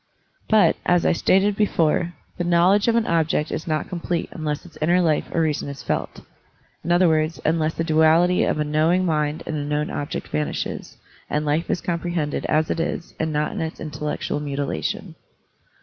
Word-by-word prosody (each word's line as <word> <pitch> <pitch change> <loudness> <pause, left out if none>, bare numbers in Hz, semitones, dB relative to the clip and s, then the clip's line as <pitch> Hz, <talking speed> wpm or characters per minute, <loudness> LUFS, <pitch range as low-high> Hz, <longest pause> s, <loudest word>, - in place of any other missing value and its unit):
But, 210 -7 +4
as 175 -1 +2
I - - +4
stated 195 +4 +3
before, 175 -4 +1 0.2
the - - +1
knowl 175 +2 +4
edge 205 +2 +2
of 230 - +3
an 230 -1 +2
object 160 -2 +1
is 160 - -3
ndt 155 -2 -1
complete 170 -1 -3
unless 150 -1 -4
its 170 - -15
inner 175 +4 +3
life 160 -4 +1
or 165 - +1
reason 150 -3 -1
is 140 -1 -8
felt; - - -3 0.6
in 170 - -2
other 175 +1 +5
words, 155 0 +1
unless 160 0 +1
the 165 - -1
duality 165 +3 +4
of - - 0
a - - +2
knowing 160 +5 +2
mind 150 -2 0
and 155 - -3
a 145 - -2
known 150 +1 -1
object 145 +2 -4
vanishes, 150 - -3 0.3
and 150 +1 -1
life 150 +3 0
is - - 0
comprehended 170 -3 -2
as 155 0 +1
it - - -1
is 165 0 -3
and 160 0 -1
not 150 0 0
in - - -4
its 160 0 -4
intellectual 150 -1 -3
mutilation. 140 - -3
160 Hz, 190 wpm, -23 LUFS, 150-175 Hz, 0.6 s, other